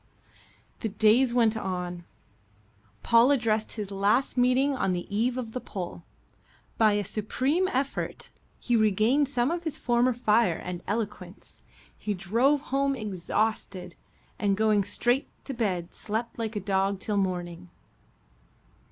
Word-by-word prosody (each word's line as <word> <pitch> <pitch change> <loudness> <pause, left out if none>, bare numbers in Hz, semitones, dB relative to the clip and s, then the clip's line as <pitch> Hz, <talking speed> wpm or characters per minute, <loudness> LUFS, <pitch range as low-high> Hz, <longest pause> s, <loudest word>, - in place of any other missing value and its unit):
The 220 - -2
days 220 +5 +4
went 230 -2 +3
on. 180 -4 -4 1.0
Paul 235 +2 +5
addressed 220 -6 +1
his 205 -3 -5
last 205 +7 +1
meeting 255 +3 +3
on 195 -7 0
the 175 -1 -3
eve 240 +4 +1
of 235 -3 -4
the 255 - -4
poll. 180 -3 -6 0.8
By 215 -2 +5
a 205 0 0
supreme 260 - 0
effort 270 -3 -3 0.3
he 240 - 0
regained 220 +6 +3
some 255 0 +1
of 345 0 -3
his 320 -3 -3
former 245 +1 +2
fire 225 -6 +2
and 180 -1 -6
eloquence. 205 -3 -5 0.3
He 210 -1 -3
drove 235 +11 +2
home 275 0 +2
exhausted, 200 -3 -2 0.5
and 200 -3 +1
going 215 -2 +3
straight 245 +8 0 0.2
to 275 - -3
bed 190 -8 -2
slept 225 +3 -4
like 225 -1 -3
a - - 0
dog 195 0 0
till 210 +1 -2
morning. 180 -2 -3
220 Hz, 135 wpm, -27 LUFS, 195-250 Hz, 1.0 s, Paul